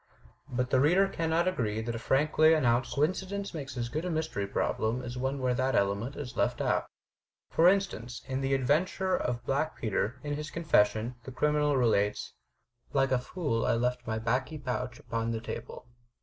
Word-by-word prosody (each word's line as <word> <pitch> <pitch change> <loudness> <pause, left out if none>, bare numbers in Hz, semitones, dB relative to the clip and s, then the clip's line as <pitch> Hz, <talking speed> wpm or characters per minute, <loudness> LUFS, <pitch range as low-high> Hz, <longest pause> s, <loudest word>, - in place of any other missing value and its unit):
But 125 0 -2
the 130 - +4
reader 175 +8 +4
cannot 165 -1 0
agree 110 -12 0
that 115 +1 -3
a 115 - -4
frankly 155 +6 +4
announced 125 -4 +1
coincidence 190 +6 -1
makes 135 -5 -6
as 120 -1 -1
good 155 +7 -3
a 180 - -2
mystery 160 - -2
problem 110 +4 -1
as 120 0 -6
one 130 +2 -1
where 130 -1 +1
that 130 +2 +1
element 100 +7 0
is 130 -4 -6
left - - 0
out. - - +1 0.6
For 165 - +5
instance 155 - -1
in 130 0 -2
"The 135 0 +1
Adventure 170 +8 +1
of 120 -1 -2
Black 140 +4 0
Peter," 110 +3 -1
in 145 -1 -2
his 150 +1 -4
confession, 115 -7 +2
the 130 - -8
criminal 150 +1 +2
relates: 105 -4 +1 0.6
"Like 135 -1 +2
a 130 - +3
fool 125 -4 -2
I - - +2
left 125 +1 -1
my 110 0 -1
baccy 125 +7 -1
pouch 125 -3 -3
upon 115 0 -3
the 115 -1 -1
table." 115 +2 -7
130 Hz, 180 wpm, -30 LUFS, 120-155 Hz, 0.6 s, For